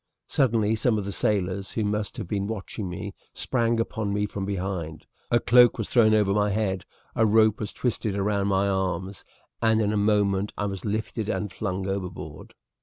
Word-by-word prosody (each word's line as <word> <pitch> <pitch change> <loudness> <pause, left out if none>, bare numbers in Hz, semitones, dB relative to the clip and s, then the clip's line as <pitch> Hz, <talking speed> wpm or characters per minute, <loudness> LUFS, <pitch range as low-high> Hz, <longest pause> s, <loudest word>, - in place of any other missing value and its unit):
Suddenly 115 -5 +2
some 110 0 +2
of 100 - -3
the 100 - -3
sailors, 95 0 -1
who 110 - -1
must 105 0 -2
have - - -5
been 100 +1 -2
watching 105 -2 -5
me, 100 +3 -6 0.2
sprang 115 -2 +1
upon 110 -2 -2
me 105 +1 0
from 100 -1 -4
behind, 90 -5 -4 0.2
a 120 - +4
cloak 120 +1 +6
was 110 - -4
thrown 110 -3 +5
over 105 -2 +3
my 105 0 +2
head, 95 -3 -1 0.3
a 110 - +3
rope 110 0 +4
was 105 - -3
twisted 110 -4 -2
round 100 0 0
my 95 0 +2
arms, 95 -1 -2 0.4
and 110 -1 +3
in 105 -1 +1
a - - +1
moment 100 -1 +2
I 105 - -1
was 95 0 -4
lifted 110 +1 -2
and 105 -3 -2
flung 95 -2 -3
overboard. 90 -6 -5
105 Hz, 185 wpm, -26 LUFS, 95-110 Hz, 0.4 s, cloak